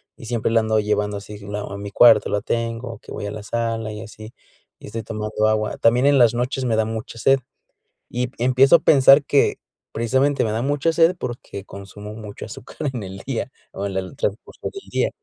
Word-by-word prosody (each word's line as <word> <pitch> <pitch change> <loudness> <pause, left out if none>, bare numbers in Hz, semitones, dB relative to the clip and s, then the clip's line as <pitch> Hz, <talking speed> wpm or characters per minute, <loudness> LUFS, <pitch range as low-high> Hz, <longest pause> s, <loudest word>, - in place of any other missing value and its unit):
y - - -12
siempre 115 -1 -1
la 115 - +4
ando 110 -1 +1
llevando 105 -1 0
así 105 +1 -9
q 100 - -12
no 105 0 -5
a 100 - -5
mi 100 0 -6
cuarto 110 +1 +6
la 105 - 0
tengo, 115 0 -3
que - - -14
voy - - -5
a 100 - -4
la 110 - -6
sala 115 0 -2
y 105 0 -7
así, 110 0 -10 0.5
y - - -13
estoy 115 +2 -5
tomando 110 0 -1
agua. 110 0 0
También 120 +3 +4
en 140 -1 +5
las 120 -2 +5
noches 125 +2 -1
me 115 -2 +1
da 110 0 +2
mucha 110 +1 -6
sed, 135 +4 +4 0.7
y 125 +1 -2
em 125 - -9
empiezo 130 +5 +5
a - - -10
pensar 135 0 +6
que, 140 - +2 0.3
precisamente, 130 +5 +1
me 110 - -1
da 110 +2 -1
mucha 145 +4 +1
sed 165 +2 +4
porque 120 -5 -6
consumo 100 +2 -10
mucho 105 -2 -8
azúcar - - -11 0.2
en 120 -4 -4
el 95 0 -8
día, 130 -1 -3 0.2
o 100 - -4
en 95 -1 -3
el 95 -1 -4
transcurso 105 +2 -4
del 395 - -11
día. - - +1
115 Hz, 220 wpm, -22 LUFS, 105-125 Hz, 0.7 s, cuarto